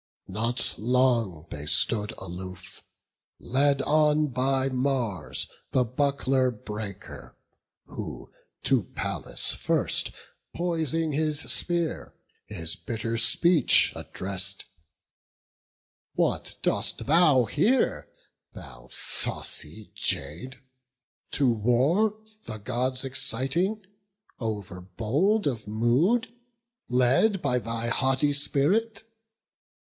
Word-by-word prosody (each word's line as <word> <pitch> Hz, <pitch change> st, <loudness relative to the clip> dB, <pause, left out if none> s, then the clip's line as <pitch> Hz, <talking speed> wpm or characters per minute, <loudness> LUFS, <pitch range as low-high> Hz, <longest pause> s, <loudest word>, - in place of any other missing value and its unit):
Not 115 Hz, +5 st, 0 dB
long 115 Hz, -8 st, +1 dB
they 75 Hz, 0 st, -6 dB
stood 105 Hz, +5 st, +3 dB
aloof, 90 Hz, 0 st, -8 dB, 0.5 s
led 140 Hz, +2 st, +1 dB
on 150 Hz, 0 st, +3 dB
by 130 Hz, +1 st, 0 dB
Mars 125 Hz, -, -1 dB, 0.3 s
The 130 Hz, -, +4 dB
buckler 130 Hz, +1 st, 0 dB
breaker, 105 Hz, -3 st, -8 dB, 0.5 s
who -, -, -8 dB, 0.3 s
to -, -, +2 dB
Pallas -, -, +1 dB
first, -, -, +1 dB, 0.5 s
Poising 165 Hz, -2 st, -1 dB
his 155 Hz, +1 st, 0 dB
spear, 170 Hz, -1 st, -1 dB, 0.3 s
his 85 Hz, -5 st, -4 dB
bitter 115 Hz, +5 st, -4 dB
speech 170 Hz, +9 st, +4 dB
address'd: 100 Hz, +1 st, -4 dB, 1.5 s
"What -, -, 0 dB
dost -, -, 0 dB
thou 150 Hz, -5 st, +4 dB
here, 225 Hz, -, +1 dB, 0.4 s
thou 65 Hz, -2 st, -12 dB
saucy 90 Hz, +8 st, +2 dB
jade, 85 Hz, -, -2 dB, 0.7 s
to 140 Hz, -, +1 dB
war 135 Hz, -, +2 dB, 0.3 s
The 110 Hz, -, -5 dB
Gods 125 Hz, +4 st, -2 dB
exciting, 135 Hz, -, -1 dB, 0.5 s
overbold 110 Hz, -, -1 dB
of 115 Hz, -7 st, -2 dB
mood, 135 Hz, -, +1 dB, 0.6 s
Led 130 Hz, -, +3 dB
by 125 Hz, -6 st, 0 dB
thy 115 Hz, 0 st, -3 dB
haughty 135 Hz, +4 st, +1 dB
spirit? 200 Hz, +10 st, 0 dB
130 Hz, 85 wpm, -26 LUFS, 110-150 Hz, 1.5 s, The